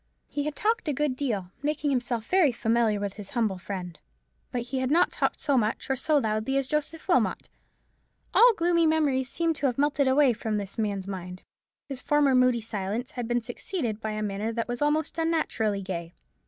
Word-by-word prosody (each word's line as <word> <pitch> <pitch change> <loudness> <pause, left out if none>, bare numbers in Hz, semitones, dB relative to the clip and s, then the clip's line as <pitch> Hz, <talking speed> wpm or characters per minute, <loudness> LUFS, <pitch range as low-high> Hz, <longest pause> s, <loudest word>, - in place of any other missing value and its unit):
He 290 0 -2
had 300 -1 -3
talked 445 -3 0
a 300 - +1
good 285 -1 0
deal, 215 -10 -2
making 295 0 0
himself 240 -3 -1
very 365 -7 +4
familiar 225 -2 +1
with 200 -1 -3
his 205 -2 -8
humble 220 -7 0
friend. 180 -1 -6 0.5
But 245 -2 -2
he 260 +2 -3
had 260 0 0
not 335 +5 +4
talked - - -1
so 280 -4 +2
much 220 +4 -1
or - - +2
so 305 +3 +1
loudly 220 +1 0
as 275 -1 0
Joseph 305 +2 -3
Wilmot. 360 - +1 0.8
All 480 -1 +7
gloomy 335 -1 +3
memories 285 -5 +2
seemed 330 -1 0
to 280 - +1
have 245 - -2
melted 285 -1 +2
away 265 -1 +5
from 220 -1 -2
this 200 +1 -5
man's 200 -3 -1
mind. 180 -2 -6 0.4
His 275 -2 -4
former 295 -2 +3
moody 255 -2 +4
silence 215 +4 -3
had 245 -4 -4
been 240 0 +1
succeeded 240 - -4
by 220 -1 -3
a 215 0 -3
manner 205 +2 -2
that 230 0 -2
was 245 +1 -4
almost 305 +3 +1
unnaturally 225 -11 0
gay. 170 -2 -5
250 Hz, 195 wpm, -27 LUFS, 215-295 Hz, 0.8 s, All